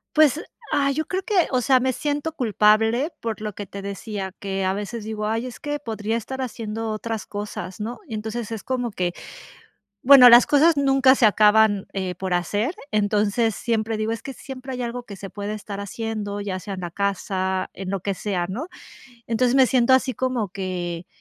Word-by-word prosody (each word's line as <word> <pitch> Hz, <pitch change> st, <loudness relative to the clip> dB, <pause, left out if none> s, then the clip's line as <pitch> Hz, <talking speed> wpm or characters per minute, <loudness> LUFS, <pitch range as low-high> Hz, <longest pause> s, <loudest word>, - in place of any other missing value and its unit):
Pues, 310 Hz, +1 st, +4 dB, 0.3 s
ay, 275 Hz, -1 st, +2 dB
yo 315 Hz, +1 st, -1 dB
creo 375 Hz, +1 st, -2 dB
que, 385 Hz, -5 st, +2 dB
o 255 Hz, -2 st, +2 dB
sea, 260 Hz, +2 st, +4 dB
me 260 Hz, 0 st, 0 dB
siento 295 Hz, +3 st, -2 dB
culpable 225 Hz, -, +2 dB
por 225 Hz, -2 st, -4 dB
lo 210 Hz, -2 st, -4 dB
que 205 Hz, -, -6 dB
te 200 Hz, +1 st, -8 dB
decía 200 Hz, -1 st, -5 dB
que 195 Hz, -1 st, -2 dB
a 190 Hz, -, +1 dB
veces 210 Hz, +2 st, -5 dB
digo: 215 Hz, -1 st, -3 dB
"Ay, 225 Hz, +3 st, -1 dB
es 250 Hz, -3 st, -8 dB
que 295 Hz, 0 st, -3 dB
podría 225 Hz, -3 st, -2 dB
estar 265 Hz, +4 st, -5 dB
haciendo 225 Hz, -2 st, -4 dB
otras 215 Hz, -1 st, -4 dB
cosas", 205 Hz, -2 st, -6 dB
¿no? 225 Hz, +3 st, -5 dB
Entonces, 220 Hz, +1 st, -4 dB
es 220 Hz, -3 st, -5 dB
como 245 Hz, -3 st, -2 dB
que, 180 Hz, -3 st, -2 dB, 0.9 s
bueno, 255 Hz, -1 st, +9 dB
las 240 Hz, +1 st, +8 dB
cosas 310 Hz, +3 st, +4 dB
nunca 270 Hz, -1 st, +5 dB
se 245 Hz, -, +4 dB
acaban, 210 Hz, -1 st, +4 dB
eh, 190 Hz, -2 st, -3 dB
por 185 Hz, -1 st, -2 dB
hacer. 205 Hz, -, 0 dB, 0.2 s
Entonces, 210 Hz, +1 st, +1 dB
siempre 225 Hz, -1 st, -1 dB
digo: 215 Hz, +1 st, -1 dB
"Es 230 Hz, -, -5 dB
que 270 Hz, -, -6 dB
siempre 265 Hz, 0 st, -8 dB
hay 250 Hz, -, -3 dB
algo 240 Hz, 0 st, -4 dB
que 200 Hz, -4 st, -9 dB
se 195 Hz, 0 st, -8 dB
puede 205 Hz, +1 st, -4 dB
estar 205 Hz, -1 st, -7 dB
haciendo, 205 Hz, 0 st, -4 dB
ya 195 Hz, -2 st, -3 dB
sea 200 Hz, 0 st, -6 dB
en 185 Hz, -, -6 dB
la 175 Hz, -, -5 dB
casa, 190 Hz, 0 st, -1 dB
en 190 Hz, -1 st, -6 dB
lo 195 Hz, -1 st, -2 dB
que 200 Hz, +2 st, -2 dB
sea", 185 Hz, -3 st, -2 dB
¿no? 245 Hz, -, -4 dB, 0.6 s
Entonces, 240 Hz, +2 st, +1 dB
me 265 Hz, -2 st, +6 dB
siento 255 Hz, 0 st, +3 dB
así, 260 Hz, 0 st, +3 dB
como 255 Hz, -6 st, -1 dB
que 180 Hz, -2 st, -4 dB
220 Hz, 200 wpm, -23 LUFS, 200-255 Hz, 0.9 s, bueno